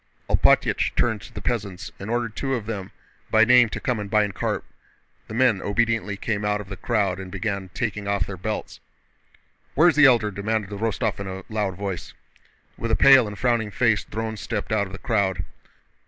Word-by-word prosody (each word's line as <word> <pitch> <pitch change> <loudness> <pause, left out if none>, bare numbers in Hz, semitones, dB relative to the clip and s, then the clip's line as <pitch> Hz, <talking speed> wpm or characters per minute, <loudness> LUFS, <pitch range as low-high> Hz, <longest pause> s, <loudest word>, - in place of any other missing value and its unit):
Alpátych - - +3
turned 110 -3 +1
to - - -12
the 100 - -7
peasants 100 -5 -3
and 100 - -7
ordered 115 -2 -1
two 135 -1 -1
of 115 -4 -4
them 100 -4 -5 0.4
by 110 0 +5
name 125 -1 +6
to - - -5
come 125 -4 -1
and 105 -1 -5
bind 105 -1 +2
Karp. - - -2 0.6
The 110 - -7
men 120 -5 +3
obediently 105 -1 0
came 105 0 -2
out 105 0 0
of 100 -2 -9
the 100 - -5
crowd 100 -4 0
and 95 -1 -8
began 100 -1 -3
taking 105 -3 -3
off 100 -2 +1
their 100 - -6
belts. 105 +4 -5 1.0
"Where's 165 +4 +5
the 150 -1 +7
Elder?" 115 -5 +3
demanded 105 +1 -2
Rostóv 105 -1 -2
in 100 - -5
a 95 0 -6
loud 105 -4 -1
voice. 95 -3 -5 0.6
With 115 - -2
a - - +3
pale 135 -4 +7
and 105 0 -7
frowning 120 -4 +1
face 115 0 +2
Dron 110 0 -5
stepped - - -4
out 105 -2 +1
of - - -12
the - - -5
crowd. 95 -7 0
105 Hz, 195 wpm, -24 LUFS, 100-115 Hz, 1.0 s, the